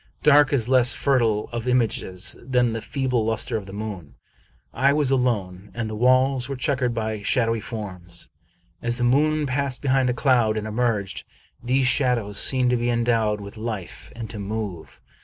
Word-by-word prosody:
Dark 145 Hz, -1 st, +6 dB
is 125 Hz, -6 st, +1 dB
less 125 Hz, -1 st, +4 dB
fertile 115 Hz, -6 st, +1 dB
of 120 Hz, +1 st, -4 dB
images 110 Hz, -6 st, 0 dB
than 125 Hz, -2 st, +1 dB
the 115 Hz, -, -4 dB
feeble 130 Hz, -3 st, -1 dB
luster 110 Hz, +2 st, +1 dB
of 105 Hz, -3 st, -4 dB
the -, -, -9 dB
moon. 100 Hz, -9 st, -7 dB, 0.6 s
I 135 Hz, +3 st, +3 dB
was 145 Hz, -3 st, +1 dB
alone, 105 Hz, -7 st, -1 dB
and 115 Hz, -1 st, -2 dB
the 110 Hz, -, -5 dB
walls 130 Hz, +2 st, +3 dB
were 135 Hz, -, -3 dB
checkered 130 Hz, -3 st, 0 dB
by 110 Hz, -2 st, -3 dB
shadowy 115 Hz, +1 st, +1 dB
forms. 90 Hz, -7 st, -7 dB, 0.5 s
As 120 Hz, 0 st, -2 dB
the 125 Hz, -, -2 dB
moon 150 Hz, +5 st, +2 dB
passed 135 Hz, -1 st, -1 dB
behind 130 Hz, -2 st, +2 dB
a -, -, +1 dB
cloud 120 Hz, -5 st, +2 dB
and 110 Hz, -, -3 dB
emerged, 110 Hz, -3 st, -1 dB, 0.4 s
these 130 Hz, +2 st, +1 dB
shadows 120 Hz, -6 st, +1 dB
seemed 130 Hz, -2 st, +2 dB
to 125 Hz, -, +2 dB
be 120 Hz, +1 st, -1 dB
endowed 115 Hz, -3 st, +1 dB
with 100 Hz, +2 st, -10 dB
life, 110 Hz, -5 st, -6 dB
and 115 Hz, -1 st, -6 dB
to 110 Hz, -, -7 dB
move. 100 Hz, -4 st, -5 dB
120 Hz, 175 wpm, -23 LUFS, 110-130 Hz, 0.6 s, Dark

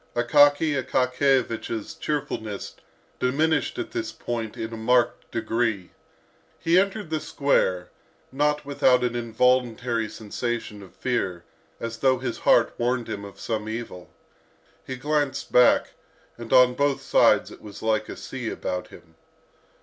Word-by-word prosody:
Akaky 145 Hz, +3 st, +4 dB
Akakiyevich's 125 Hz, -4 st, 0 dB
cheerfulness 110 Hz, -8 st, -4 dB, 0.4 s
diminished 155 Hz, -, +1 dB
at 360 Hz, -, -4 dB
this 350 Hz, -2 st, -3 dB
point 115 Hz, -3 st, -5 dB
in 110 Hz, +1 st, -5 dB
a -, -, -4 dB
marked 120 Hz, +2 st, +1 dB
degree. 115 Hz, -4 st, -1 dB, 0.7 s
He 170 Hz, +2 st, +3 dB
entered 195 Hz, -2 st, -2 dB
the 155 Hz, -, 0 dB
square, 95 Hz, -13 st, 0 dB, 0.4 s
not 150 Hz, +2 st, 0 dB
without 130 Hz, -3 st, +3 dB
an 120 Hz, -1 st, -1 dB
involuntary 120 Hz, -1 st, +1 dB
sensation 110 Hz, -1 st, -4 dB
of 95 Hz, -, -14 dB
fear, 95 Hz, -9 st, -2 dB, 0.4 s
as 115 Hz, 0 st, -5 dB
though 130 Hz, -1 st, +3 dB
his 125 Hz, -1 st, -4 dB
heart -, -, +4 dB
warned 120 Hz, 0 st, 0 dB
him 100 Hz, -, -5 dB
of 100 Hz, -1 st, -11 dB
some 110 Hz, -2 st, -3 dB
evil. 110 Hz, -6 st, -6 dB, 0.8 s
He 130 Hz, -, -4 dB
glanced 145 Hz, 0 st, -1 dB
back, 125 Hz, 0 st, +5 dB, 0.5 s
and 115 Hz, -1 st, -10 dB
on 125 Hz, -1 st, +6 dB
both 140 Hz, +1 st, 0 dB
sides -, -, +4 dB
it -, -, -13 dB
was 105 Hz, 0 st, -11 dB
like 110 Hz, -1 st, 0 dB
a -, -, -7 dB
sea 125 Hz, -4 st, -5 dB
about 90 Hz, -1 st, -4 dB
him. 85 Hz, -1 st, -16 dB
120 Hz, 135 wpm, -25 LUFS, 110-135 Hz, 0.8 s, on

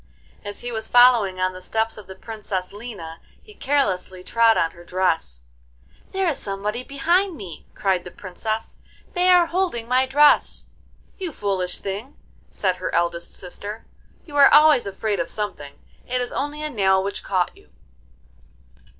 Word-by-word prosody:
As 205 Hz, 0 st, -6 dB
he 245 Hz, -, -4 dB
was 220 Hz, -1 st, -3 dB
following 240 Hz, -7 st, +5 dB
on 185 Hz, 0 st, +1 dB
the 185 Hz, -, -10 dB
steps 220 Hz, +4 st, -1 dB
of 210 Hz, -3 st, -12 dB
the 190 Hz, -, -9 dB
Princess 200 Hz, -3 st, -5 dB
Lina, 200 Hz, -7 st, -8 dB, 0.2 s
he 425 Hz, -, -16 dB
carelessly 190 Hz, -, -1 dB
trod 230 Hz, +2 st, +4 dB
on 165 Hz, -, +1 dB
her 170 Hz, -, -15 dB
dress. 165 Hz, -, -1 dB, 0.7 s
'There 385 Hz, -1 st, 0 dB
is 300 Hz, -, -1 dB
somebody 205 Hz, +4 st, -3 dB
behind 340 Hz, +7 st, +1 dB
me,' 180 Hz, -, -10 dB
cried 190 Hz, -3 st, 0 dB
the -, -, -8 dB
Princess; 215 Hz, +5 st, -5 dB, 0.3 s
'they 360 Hz, 0 st, +2 dB
are 355 Hz, -1 st, +7 dB
holding 335 Hz, -10 st, -1 dB
my 255 Hz, +2 st, +3 dB
dress.' 290 Hz, +3 st, +4 dB, 0.5 s
'You 365 Hz, -3 st, -3 dB
foolish 190 Hz, -7 st, -2 dB
thing,' 205 Hz, +8 st, -6 dB, 0.3 s
said 185 Hz, -2 st, -1 dB
her -, -, -4 dB
eldest 170 Hz, 0 st, -1 dB
sister, 205 Hz, +4 st, -7 dB, 0.4 s
'you 295 Hz, -, -11 dB
are 280 Hz, -, +8 dB
always 300 Hz, -6 st, +6 dB
afraid 205 Hz, 0 st, -2 dB
of 170 Hz, -, -2 dB
something. 180 Hz, -10 st, -4 dB, 0.3 s
It 250 Hz, 0 st, 0 dB
is 245 Hz, -1 st, -1 dB
only 295 Hz, +2 st, -3 dB
a 305 Hz, -, -2 dB
nail 190 Hz, -4 st, +3 dB
which 200 Hz, +1 st, -4 dB
caught 185 Hz, -2 st, 0 dB
you. 75 Hz, -, -21 dB
210 Hz, 160 wpm, -23 LUFS, 185-265 Hz, 0.7 s, are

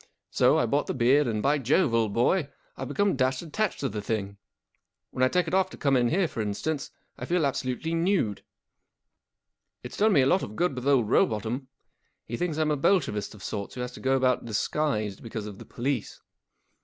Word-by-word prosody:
So -, -, +4 dB
I -, -, +2 dB
bought 140 Hz, +6 st, 0 dB
the -, -, -2 dB
beard, 130 Hz, +3 st, +4 dB
and, 110 Hz, -2 st, -1 dB
by 145 Hz, +2 st, +2 dB
Jove, 135 Hz, +1 st, +2 dB
old 115 Hz, -2 st, +2 dB
boy, 140 Hz, -, +1 dB, 0.3 s
I've 135 Hz, -, -5 dB
become 200 Hz, +7 st, +1 dB
dashed 130 Hz, +1 st, 0 dB
attached 195 Hz, +6 st, -2 dB
to 135 Hz, -, 0 dB
the 105 Hz, 0 st, -4 dB
thing. 100 Hz, -2 st, -3 dB, 0.8 s
WTten 130 Hz, -, 0 dB
I -, -, +6 dB
take 180 Hz, +5 st, +1 dB
it 160 Hz, -, -4 dB
off 190 Hz, 0 st, +3 dB
to -, -, -11 dB
come 140 Hz, -2 st, +2 dB
in 120 Hz, -2 st, +3 dB
here, 180 Hz, +4 st, +2 dB
for 115 Hz, -, -4 dB
instance, 135 Hz, +8 st, -3 dB, 0.3 s
I -, -, -4 dB
feel 175 Hz, -3 st, +1 dB
absolutely 135 Hz, +3 st, -2 dB
nude. 165 Hz, -, 0 dB, 1.4 s
It's -, -, -8 dB
done 215 Hz, 0 st, +4 dB
me 140 Hz, -, +5 dB
a -, -, +3 dB
lot 180 Hz, +8 st, +3 dB
of 105 Hz, -, -6 dB
good 175 Hz, +2 st, +1 dB
with 125 Hz, 0 st, -6 dB
offl 135 Hz, -5 st, +4 dB
Rowbotham. 115 Hz, +4 st, 0 dB, 0.6 s
He 120 Hz, -, -5 dB
thinks 165 Hz, +1 st, -2 dB
I'm 155 Hz, -1 st, +1 dB
a 150 Hz, -, +1 dB
Bolshevist 135 Hz, -, +1 dB
of 100 Hz, -, -13 dB
sorts 100 Hz, -1 st, -5 dB
who 125 Hz, -, -4 dB
has 125 Hz, 0 st, -4 dB
to -, -, -11 dB
go 135 Hz, 0 st, +1 dB
about 130 Hz, -1 st, +2 dB
disguised 110 Hz, -2 st, -1 dB
because 110 Hz, -2 st, -6 dB
of 105 Hz, -2 st, -8 dB
the -, -, -10 dB
police. 125 Hz, -1 st, -3 dB
130 Hz, 210 wpm, -27 LUFS, 115-155 Hz, 1.4 s, I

